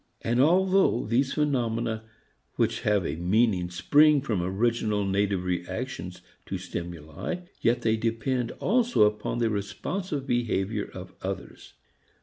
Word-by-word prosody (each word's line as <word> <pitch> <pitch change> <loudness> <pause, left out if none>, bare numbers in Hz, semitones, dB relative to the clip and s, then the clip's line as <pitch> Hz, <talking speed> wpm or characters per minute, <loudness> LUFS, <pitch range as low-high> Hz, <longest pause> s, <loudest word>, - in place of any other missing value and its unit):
And 120 +2 +2
although 185 -3 +3
these 130 +5 +1
phenomena 115 -6 0 0.5
which - - 0
have 105 -4 +2
a 70 - -2
meaning 90 0 +2
spring 145 - +5
from 105 -6 -1
original 105 +2 0
native 100 -1 0
reactions 90 +1 -4 0.2
to 95 - -3
stimuli, 85 - -5 0.2
yet 120 +1 +1
they 110 -1 +2
depend 115 +2 -1
also 240 - +2
upon 105 +2 0
the 115 -2 +1
responsive 135 - -3
behavior 110 -5 -1
of - - -9
others. - - -6
110 Hz, 125 wpm, -27 LUFS, 95-130 Hz, 0.5 s, spring